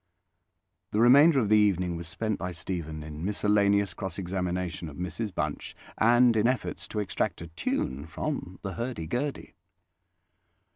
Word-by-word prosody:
The 105 - -1
remainder 140 +6 +7
of 110 - +1
the 110 - +6
evening 90 -4 +2
was 85 -1 -6
spent 110 +5 -2
by 90 -1 -4
Stephen 80 -2 -5
in 75 +1 -7
miscellaneous 100 0 +2
cross 95 -3 -5
examination 90 -2 -3
of 70 - -11
Mrs 95 +5 -3
Bunch - - -3 0.2
and 120 +1 +5
in 110 +1 +3
efforts 130 0 -2
to 105 - -3
extract 100 -4 -1
a 85 - -8
tune 70 -3 -2
from 95 - -4
the 95 -2 -4
hurdy 115 -3 -4
gurdy. 130 - -3
95 Hz, 150 wpm, -28 LUFS, 85-110 Hz, 0.2 s, remainder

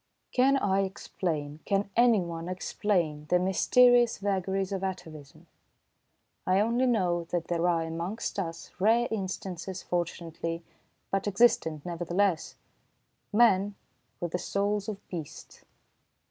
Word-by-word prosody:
Can 270 +2 +4
I 195 -6 +1
explain, 160 -6 -3
can 200 0 0
anyone 180 -8 +2
explain, 175 -5 -1
the 180 - +5
mysterious 240 +6 +4
vagaries 195 -1 -1
of 195 -1 -3
atavism? 160 -7 -7 1.0
I 185 +1 +4
only 235 +4 +2
know 180 -8 +1
that 170 0 -3
there 170 0 +1
are 165 -1 +1
amongst 170 +7 -4
us, 165 -3 -5
rare 230 +5 +4
instances 190 -2 -4
fortunately, 170 -1 -3 0.5
but 195 +1 0
existent 195 -8 +2
nevertheless 175 +1 0 0.8
men 205 -3 +4 0.4
with 175 -1 -3
the 180 - -1
souls 205 +2 -1
of 200 -2 -7
beasts. 165 -5 -8
185 Hz, 115 wpm, -29 LUFS, 170-205 Hz, 1.0 s, the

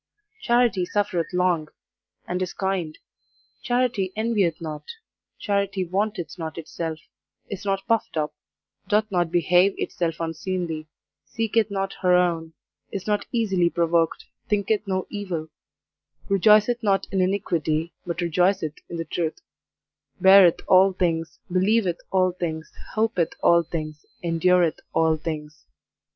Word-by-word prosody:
Charity 240 - +2
suffereth 180 -3 -1
long, 180 -3 +1 0.6
and 180 +1 -2
is 185 - -2
kind; 190 -5 -2 0.6
charity 245 -6 0
envieth 210 -7 +1
not; 155 -3 -6 0.5
charity 200 -2 -1
vaunteth 185 -3 -2
not 160 -1 -5
itself, 165 0 -4 0.5
is 200 0 -6
not 195 0 -1
puffed 225 -7 0
up, 150 -1 -1 0.5
doth 215 0 +1
not 175 -3 +1
behave 180 +2 +3
itself 165 -2 -2
unseemly, 165 -1 -3 0.4
seeketh 225 -1 0
not 195 -1 -2
her 180 -1 +4
own, 165 -2 +1 0.4
is 195 - -5
not 210 -1 -1
easily 195 -7 +2
provoked, 170 -1 +1 0.2
thinketh 210 0 0
no 185 -1 -1
evil; 180 -6 -4 0.8
rejoiceth 215 +4 +4
not 200 -3 +1
in 190 -1 +1
iniquity, 170 -4 0
but 170 0 -4
rejoiceth 175 -1 +1 0.2
in 170 - -5
the 165 - -3
truth; 160 0 -3 0.8
beareth 190 -3 +7
all 190 +1 +6
things, 165 -3 -1
believeth 185 -1 +2
all 185 -1 +2
things, 165 -3 -5 0.2
hopeth 215 -6 +1
all 170 0 +6
things, 155 -2 -6 0.2
endureth 170 0 +2 0.2
all 160 -1 +3
things. 150 -1 -6
180 Hz, 125 wpm, -24 LUFS, 165-200 Hz, 0.8 s, beareth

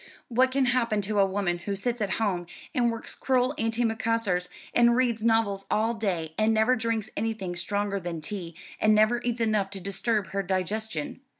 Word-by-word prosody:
What 255 +2 +3
can 265 0 +2
happen 235 -3 +1
to 205 +1 -1
a 195 - +6
woman 190 -3 -1
who 200 +3 -3
sits 235 +4 -2
at 200 -2 0
home 185 -6 -1 0.3
and 240 -2 +2
works 230 0 -6
crewel 255 0 +1
antimacassars 225 -5 0 0.2
and 235 0 +5
reads 240 -3 +1
novels 225 -4 +2
all 225 +2 +2
day, 180 -8 -2
and 215 +1 +4
never 220 +3 +4
drinks 225 -2 -2
anything 215 -5 -2
stronger 200 +3 -1
than 170 -2 -4
tea, 170 0 -5 0.2
and 215 0 +4
never 215 +3 +3
eats 240 -1 -1
enough 215 -3 +1
to 195 -1 -6
disturb 200 +2 -1
her 195 +1 -1
digestion? 215 - -2
215 Hz, 180 wpm, -27 LUFS, 195-230 Hz, 0.3 s, a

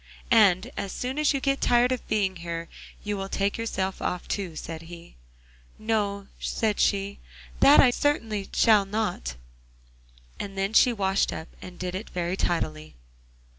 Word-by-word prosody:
'And 210 0 +5
as 195 - -3
soon 260 +4 -3
as 305 - +3
you 275 - 0
get 275 0 0
tired 245 +1 +4
of 255 - -3
being 195 -3 0
here 170 0 -5 0.4
you 210 0 -2
will 195 0 -5
take 200 +1 0
yourself 195 -4 -3
off 180 - -3
too,' 185 -6 -3
said 160 0 -6
he. 170 0 -11 0.6
'No,' 205 -2 -1
said 215 -2 -1
she, 200 0 +1 0.4
'that 285 +2 +7
I 250 - +7
shall - - -6
certainly 220 -9 0 0.2
not.' 205 - +2 1.0
And 195 -1 -6
then 195 +2 -1
she 245 - +6
washed 195 -3 +1
up, 160 - -7
and 180 -1 -10
did 180 0 -4
it 190 +4 -5
very 175 0 -2
tidily. 155 - -2
200 Hz, 160 wpm, -26 LUFS, 180-225 Hz, 1.0 s, that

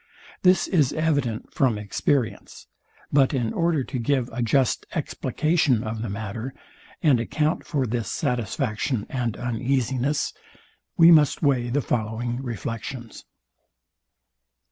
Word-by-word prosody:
This 185 0 +4
is 155 -9 +2
evident 145 -8 -1
from 125 -5 +2
experience; 110 +4 -2 0.5
but 140 0 +4
in 120 -4 -1
order 165 -5 +1
to 130 0 -4
give 130 0 0
a 120 - -3
just 125 +2 +1
explication 155 -7 +1
of 110 0 -4
the 115 - -3
matter, 110 +5 -5 0.5
and 140 -7 +5
account 150 +7 -1
for 140 -5 0
this 115 -3 -2
satisfaction 120 -2 -1
and 120 -4 -2
uneasiness, 130 +3 -1 0.6
we 170 -1 +8
must 155 -2 +4
weigh 130 -4 +2
the 140 +4 +1
following 120 +2 -2
reflections. 115 0 -6
125 Hz, 120 wpm, -24 LUFS, 115-145 Hz, 0.6 s, we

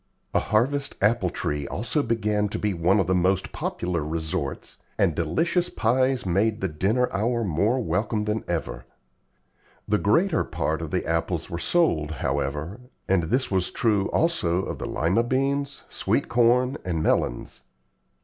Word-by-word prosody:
A - - +4
harvest 140 +6 0
apple 100 -3 +2
tree 75 -3 -3
also 120 +8 -1
began 105 -4 0
to - - -3
be 105 -2 -1
one 90 +4 +2
of 95 - +2
the 95 - +1
most 95 +1 +1
popular 85 -3 -2
resorts, 80 +1 -4 0.2
and 85 - +3
delicious 165 - 0
pies 130 - +1
made 105 +5 +1
the 95 - 0
dinner 100 +10 +1
hour 115 +4 0
more 100 +7 +1
welcome 105 +2 -1
than 105 +1 -1
ever. 80 -7 -3 1.0
The - - +2
greater - - +2
part - - -2
of - - -4
the - - -1
apples 85 0 -1
were 85 - -3
sold, 85 - +2
however, 75 - -2 0.3
and 95 -2 +3
this 125 +9 0
was 95 -2 +1
true 105 -4 +1
also 95 - +1
of - - -5
the - - -4
Lima 85 +8 +1
beans, 135 +3 -1
sweet - - -1
corn, 125 +3 +3
and 80 -3 -2
melons. - - -1
100 Hz, 155 wpm, -25 LUFS, 85-120 Hz, 1.0 s, A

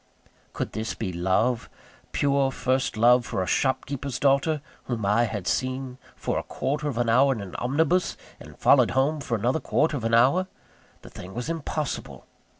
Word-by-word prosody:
Could - - -3
this 110 +1 -4
be 95 -5 -4
love? 95 +8 0 0.4
pure, 140 -1 +2
first 130 -2 -1
love 120 +2 +5
for 95 - -2
a - - -3
shopkeeper's 135 +3 -1
daughter, 145 +2 +2 0.3
whom 115 -5 -3
I 105 +4 +3
had 105 -5 -4
seen 130 +3 -2 0.2
for - - -2
a - - -6
quarter 150 +2 -2
of 135 -5 -3
an 120 -1 +1
hour 130 +4 +4
in 115 - -6
an 100 -2 -8
omnibus, 160 +8 +1 0.2
and - - -13
followed - - +5
home 145 +3 +2
for 120 - -2
another 125 +8 0
quarter 155 0 +1
of 125 - -4
an 115 0 +2
hour? 140 +11 +4 0.6
The - - -12
thing 95 +3 -10
was 120 +6 -4
impossible. 155 -2 -4
130 Hz, 175 wpm, -25 LUFS, 115-140 Hz, 0.6 s, love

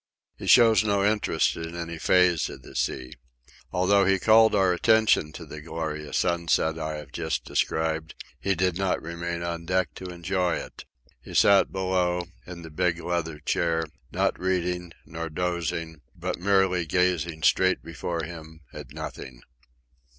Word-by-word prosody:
He - - -8
shows 115 -3 +6
no 100 -2 +1
interest 105 -6 +1
in 80 +1 -6
any 85 -1 -5
phase 90 -2 +3
of - - -10
the - - -13
sea. 65 -1 -2 0.6
Although 100 +2 +3
he 95 0 +3
called 110 +3 +5
our 95 -2 +3
attention 110 -4 +3
to - - -8
the 75 - -9
glorious 75 -2 -4
sunset 85 -1 +1
I 80 -1 -3
have 75 -2 -9
just 80 -3 -3
described, 80 0 -1 0.2
he 100 0 0
did 90 0 0
not 95 -1 +1
remain 85 +1 -5
on 85 -1 -4
deck 90 -4 0
to 95 - -8
enjoy 90 0 -1
it. - - -8 0.4
He - - -10
sat 100 -1 +5
below, 90 -2 0 0.2
in 85 -1 -9
the 80 - -10
big 85 +1 0
leather 85 -3 -2
chair, 80 +1 0 0.3
not - - 0
reading, 90 -1 -1
not 80 0 -6
dozing, 85 -3 -2
but 90 +1 -4
merely 95 -2 +2
gazing 85 -2 0
straight 95 +2 +3
before 85 +1 -4
him 80 -1 -9
at - - -9
nothing. 60 -2 -8
85 Hz, 155 wpm, -26 LUFS, 80-95 Hz, 0.6 s, shows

